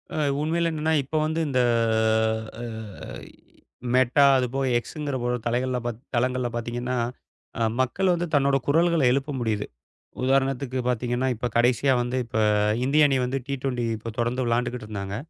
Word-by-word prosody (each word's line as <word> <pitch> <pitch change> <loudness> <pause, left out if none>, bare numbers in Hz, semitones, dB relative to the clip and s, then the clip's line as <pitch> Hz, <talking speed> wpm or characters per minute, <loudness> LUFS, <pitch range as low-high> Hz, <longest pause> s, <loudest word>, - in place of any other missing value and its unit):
அ, - - -3 0.2
உண்மையில 165 +2 +1
என்னன்னா, 160 0 0
இப்போ 145 +4 -3
வந்து 160 +1 -1
இந்த 130 -3 +1 1.0
அ, - - -5 1.3
மெட்டா, 130 +3 +4
அது 130 - +1
போக 135 0 0
எக்ஸ்ங்கிற 145 +2 -5
ஒரு 125 - +1
தலைகள்ல 125 +2 0
பாத் 120 -2 -3 0.2
தளங்கள்ல 125 +1 +1
பாத்தீங்கன்னா, 120 +2 -3 0.6
அ - - +2 0.2
மக்கள் 180 +9 +1
வந்து 175 0 -1
தன்னோட 140 -1 +3
குரல்கள 165 +1 +3
எழுப்ப 140 +3 0
முடியுது. 110 -3 -1 0.6
உதாரணத்துக்கு 135 0 +1
பாத்தீங்கன்னா, 125 +1 0
இப்ப 125 +2 -2
கடைசியா 125 +3 +3
வந்து 120 +1 -3
இப்ப 115 - -7 0.5
இந்திய 150 +3 +5
அணி 135 - +2
வந்து 130 +2 -1
டி-டுவென்டி 130 -3 -2 0.3
தொடந்து 120 +2 0
விளயாண்டுகிட்டு 120 0 -1
இருந்தாங்க. 100 -2 -4
130 Hz, 140 wpm, -25 LUFS, 120-140 Hz, 1.3 s, இந்திய